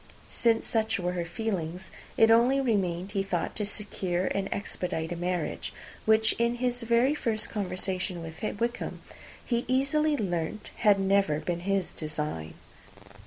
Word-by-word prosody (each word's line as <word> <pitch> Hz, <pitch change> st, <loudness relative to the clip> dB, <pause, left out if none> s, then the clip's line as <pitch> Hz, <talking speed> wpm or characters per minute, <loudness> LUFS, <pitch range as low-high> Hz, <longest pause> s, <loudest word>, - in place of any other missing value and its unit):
Since 230 Hz, -1 st, +2 dB
such 220 Hz, -2 st, +1 dB
were 180 Hz, -2 st, -1 dB
her 175 Hz, -1 st, -2 dB
feelings, 180 Hz, -2 st, -3 dB, 0.3 s
it 225 Hz, 0 st, +7 dB
only 245 Hz, +4 st, +5 dB
remained, 195 Hz, -7 st, 0 dB
he 200 Hz, -2 st, +1 dB
thought, 190 Hz, -3 st, -2 dB
to 210 Hz, -2 st, 0 dB
secure 190 Hz, -4 st, -2 dB
and 195 Hz, 0 st, -1 dB
expedite 175 Hz, -5 st, -3 dB
a -, -, -1 dB
marriage, 175 Hz, -, -2 dB, 0.3 s
which, 220 Hz, 0 st, +4 dB
in 235 Hz, +1 st, +2 dB
his 245 Hz, 0 st, -1 dB
very 235 Hz, +4 st, +3 dB
first 225 Hz, -6 st, -1 dB
conversation 185 Hz, -3 st, -2 dB
with 160 Hz, 0 st, -8 dB, 0.2 s
Wickham, 235 Hz, +1 st, -2 dB, 0.4 s
he 235 Hz, -1 st, 0 dB
easily 290 Hz, +4 st, +2 dB
learnt 180 Hz, 0 st, -2 dB
had 205 Hz, -2 st, +5 dB
never 195 Hz, -5 st, +3 dB
been 170 Hz, +2 st, -2 dB
his 195 Hz, 0 st, 0 dB
design. 150 Hz, -, -4 dB
200 Hz, 145 wpm, -29 LUFS, 175-230 Hz, 0.4 s, it